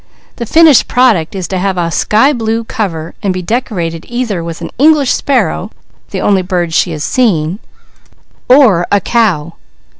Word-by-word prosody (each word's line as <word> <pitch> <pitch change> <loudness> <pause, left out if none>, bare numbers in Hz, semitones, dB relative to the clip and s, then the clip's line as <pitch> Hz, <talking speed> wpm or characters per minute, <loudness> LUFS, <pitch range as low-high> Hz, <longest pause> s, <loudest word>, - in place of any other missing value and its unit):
The 235 - -5
finished 320 -3 +5
product 220 -10 +1
is 185 -3 -4
to 185 - -2
have 190 0 -1
a 170 -1 -1
sky 225 - +2
blue 225 -2 -2
cover 170 -8 -4
and 200 -2 -1
be 185 0 -4
decorated 175 -7 -3
either 235 -8 -3
with 165 -1 -7
an - - -7
English 295 -2 +4
sparrow, 275 -2 -1 0.4
the - - -4
only 195 -2 +2
bird 175 -3 -2
she 175 - +2
has 155 -2 -5
seen, 175 - 0 0.9
or 230 -10 +4
a 205 - +4
cow. 180 -8 0
200 Hz, 160 wpm, -12 LUFS, 170-240 Hz, 0.9 s, finished